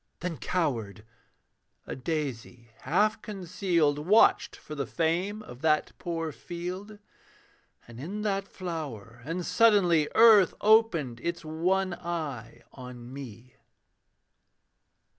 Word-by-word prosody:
Then 175 -2 -3
cowered: 115 - -2 0.8
a - - -5
daisy, 125 -5 -5
half 210 +6 +1
concealed, 180 -6 0
Watched 195 +9 +4
for 150 - -10
the 140 -4 -3
fame 180 - -1
of 125 -8 -12
that 155 -1 +2
poor 165 -2 -3
field; 180 +7 -7 0.9
And 120 0 -11
in 195 +9 -5
that 195 -1 -1
flower 140 - -7
and 170 +3 -3
suddenly 185 -9 +4
Earth 220 -5 +7
opened 205 - +3
its 170 -1 -4
one 180 +4 0
eye 155 -10 -5
on 125 -1 -10
me. 125 -3 -10
165 Hz, 105 wpm, -28 LUFS, 130-190 Hz, 0.9 s, Earth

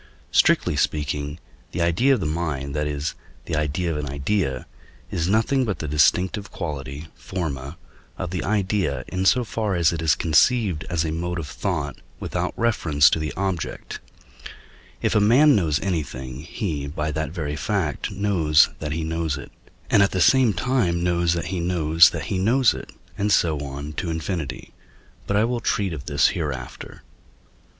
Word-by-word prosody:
Strictly - - +3
speaking, 75 0 -1 0.4
the 90 - -2
idea 120 +12 +3
of 115 - -4
the - - -2
mind, 75 -3 -2
that 75 0 0
is, 75 +1 -3 0.3
the - - -2
idea 75 +3 -1
of 75 - -2
an 75 -1 -4
idea, 70 -1 -1 0.5
is 85 +1 -1
nothing 115 +6 +2
but 105 -7 -2
the 75 - -5
distinctive 90 - +2
quality 75 -2 -6
(forma) 75 -4 -5 0.4
of 90 - -4
the 90 - -2
idea 95 - 0
in 95 +1 -2
so 125 +5 +4
far 110 -3 -2
as 85 -1 +3
it 80 - -3
is 80 -2 +3
conceived 90 - +2
as 85 -2 0
a 80 - -2
mode 90 +2 -3
of 80 -3 -4
thought - - -3 0.2
without - - -2
reference 80 -11 +3
to - - +1
the 75 0 -3
object; 95 -4 -3 1.0
if - - +2
a - - +4
man 130 +8 +6
knows 80 -6 +1
anything, 65 -8 -3
he, 80 -3 -4
by 75 +1 -3
that 80 +1 -2
very 75 -3 -4
fact, 85 -1 -2
knows 95 -7 +3
that 75 -1 -3
he 80 +1 -2
knows 80 -2 -2
it, 70 - -10 0.4
and 100 - +6
at 100 - +4
the 95 - -2
same 130 +4 +5
time 90 -4 0
knows 85 -1 +2
that 85 -1 -2
he 90 - -1
knows 85 -2 +5
that 80 -3 -5
he 95 +3 -2
knows 120 +5 +4
it, - - -8 0.3
and 105 +1 +1
so 80 -6 +3
on 70 +1 -6
to 85 - -3
infinity. 80 -3 -4 0.5
But 100 - +1
I 105 - +4
will 120 +1 0
treat 100 -5 0
of 70 -3 -7
this 70 - +3
hereafter. 70 -6 -5
85 Hz, 175 wpm, -23 LUFS, 75-100 Hz, 1.0 s, man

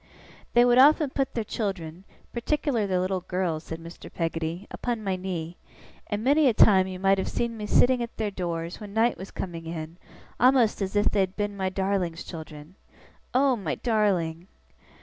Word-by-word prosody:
'They 240 0 +6
would 245 +1 +5
often 295 +1 +6
put 270 -1 -2
their 230 - 0
children 190 -5 -4 0.3
particular 240 -3 0
their 185 -1 +1
little 185 0 -1
girls,' 175 -3 -2
said 160 - -5
Mr. 165 +1 -11
Peggotty, 165 +2 -3
'upon 235 -3 -3
my 195 -2 0
knee; 175 -2 -5 0.5
and 210 0 -3
many 285 +3 +4
a 235 - +3
time 190 -4 +6
you 185 -1 -6
might 195 +1 +3
have - - -2
seen 235 -1 -2
me 210 -1 -5
sitting 245 +3 +4
at 235 - -6
their 215 -2 -1
doors, 170 -2 -4
when 205 -1 -9
night 230 +2 +3
was 190 +3 -9
coming 165 -3 -6
in, 165 0 -6 0.4
a'most 250 -4 +4
as 195 +1 -2
if 205 0 +3
they'd 190 -2 0
been 205 -1 -2
my 190 -1 -1
Darling's 185 -3 -1
children. 155 -1 -9 0.6
Oh, 265 0 +4
my 190 -9 -3
Darling! 185 -7 0
195 Hz, 180 wpm, -26 LUFS, 175-230 Hz, 0.6 s, They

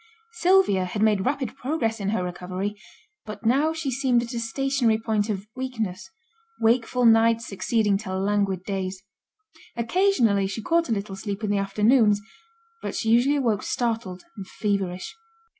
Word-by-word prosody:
Sylvia 365 - +3
had 205 +4 -2
made 210 -2 +2
rapid 265 -4 -2
progress 245 -5 -2
in 200 -1 -2
her 205 -3 0
recovery; 185 +3 -4 0.5
but 215 0 -9
now 280 +7 +3
she 320 -4 -3
seemed 250 -2 +2
at 240 +1 -7
a 235 - -2
stationary 245 -1 +1
point 220 -1 -1
of 200 -1 -3
weakness; 235 -5 -4 0.5
wakeful 240 +2 +2
nights 230 0 +4
succeeding 205 0 0
to 190 -3 -4
languid 195 -1 0
days. 190 -1 -4 0.7
Occasionally 235 - +2
she 195 +3 -5
caught 335 +1 +1
a - - -1
little 200 -2 -2
sleep 200 +1 -5
in 205 - 0
the 205 - +1
afternoons, 210 +2 +3 0.6
but - - -4
she 225 - -1
usually 245 +5 +4
awoke 230 -7 +1
startled 225 -6 -2
and 195 -2 -7
feverish. 195 -4 -2
220 Hz, 155 wpm, -25 LUFS, 200-245 Hz, 0.7 s, nights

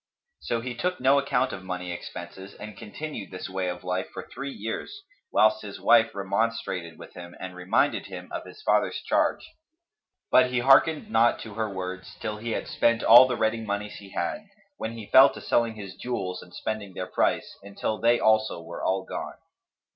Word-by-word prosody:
So 115 - -2
he 125 +1 -4
took 180 +9 -2
no 135 +2 +5
account 135 -2 0
of 95 - -6
money 90 -1 -4
expenses 90 +2 -8
and 105 -1 -9
continued 110 +1 -7
this 90 - -6
way 95 -1 -2
of 90 0 -6
life 90 +1 -2
for - - -7
three 140 +1 -6
years, 135 - -6 0.3
whilst 110 0 +4
his 100 -2 -8
wife 115 -2 +4
remonstrated 100 -4 -2
with - - -12
him 85 0 -10
and 95 -1 -7
reminded 90 +1 +1
him - - -8
of - - -4
his 430 - -13
father's - - +2
charge; - - +1 0.9
but 130 0 +6
he 125 - -1
hearkened 155 - +4
not 120 - +4
to 110 - -8
her 110 0 -2
words, 95 0 -6
till 110 -1 -4
he 115 +1 -3
had - - -3
spent 115 0 +2
all 120 +3 +9
the 125 -2 -2
ready 110 +1 +1
monies 105 0 -4
he 100 -1 -12
had, 205 - -3 0.3
when 110 +1 -4
he 115 -2 -8
fell 135 +1 +9
to - - -7
selling 115 -2 +1
his 100 -3 -8
jewels 95 -7 -4
and 90 - -14
spending 105 -4 -4
their 90 - -3
price, - - 0
until 100 +2 -4
they 120 +1 +4
also 110 -4 +2
were 85 +1 -8
all 95 0 +1
gone. - - -5
110 Hz, 190 wpm, -26 LUFS, 95-120 Hz, 0.9 s, all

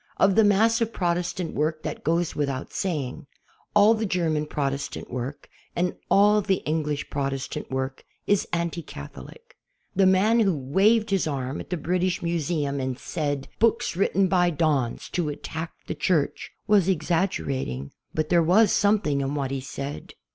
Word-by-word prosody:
Of 195 - +4
the 220 - +5
mass 220 +3 +4
of 230 0 0
Protestant 175 -2 -1
work 155 +1 -1
that - - -5
goes 165 +2 0
without 140 -2 -2
saying. 155 -5 -3 0.5
.Ml 215 +2 +6
the 220 - 0
Ger 175 -4 0
man 150 -1 -1
Protestant 140 -1 -3
work 125 +3 -5 0.3
and 180 +1 0
all 210 +1 +5
the 195 -1 0
English 150 -1 -2
Protestant 135 -2 -3
work 130 0 -3 0.2
is 205 -1 +2
anti 170 0 -1
Catholic. 470 - -11 0.4
The 195 -1 +5
man 205 +5 +4
who 195 -8 +2
waved 200 - +2
his 195 -4 +1
arm 135 -1 -3
at - - -8
the 180 - -1
British 180 +3 -1
Museum 160 -4 -1
and 130 -1 -2
said: 145 -2 -3
"Piooks 230 -6 +2
written 195 +1 +2
by 175 -1 +3
dons 150 -7 0
to 170 -4 -1
attack 160 +2 -5
the - - -3
Church" 155 -1 0 0.2
was 205 -4 +4
exaggerating, 150 - -1 0.2
but 155 0 -2
there 170 -1 +5
was 190 +6 +4
something 200 -9 +2
in 135 +1 -2
what 135 -2 -2
he 135 -1 -2
said. 140 +2 -7
165 Hz, 160 wpm, -25 LUFS, 140-190 Hz, 0.5 s, Ml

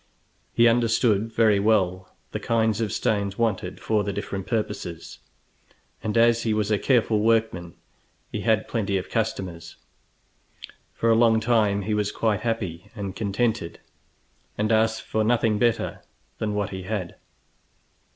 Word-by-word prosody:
He 120 0 +4
understood 115 -2 +2
very 110 -3 +3
well 95 -3 +1 0.2
the - - -3
kinds 110 -1 +1
of 110 - -1
stones 100 -2 -1
wanted 95 -5 -1
for 105 -2 0
the 100 - -2
different 95 0 -5
purposes, 95 -7 -4 0.8
and 110 +1 -2
as 115 0 +4
he 110 -2 0
was 105 0 0
a 105 - +2
careful 115 -4 +2
workman 110 -6 0 0.6
he - - -3
had 110 -2 +1
plenty 100 -4 -1
of 95 - -6
customers. 90 -7 -3 1.2
For 115 - +2
a - - +5
long 115 -1 +4
time 110 -3 +2
he 105 +2 -2
was 105 -1 0
quite 110 -3 0
happy 100 -6 -3
and 100 -3 -5
contented, 110 -3 -1 0.8
and 105 +2 0
asked 110 0 +2
for 110 - -1
nothing 110 -2 +2
better 120 -1 0 0.4
than 105 -1 -2
what 105 -1 -2
he 95 -1 -5
had. 95 -2 -4
110 Hz, 145 wpm, -24 LUFS, 100-115 Hz, 1.2 s, a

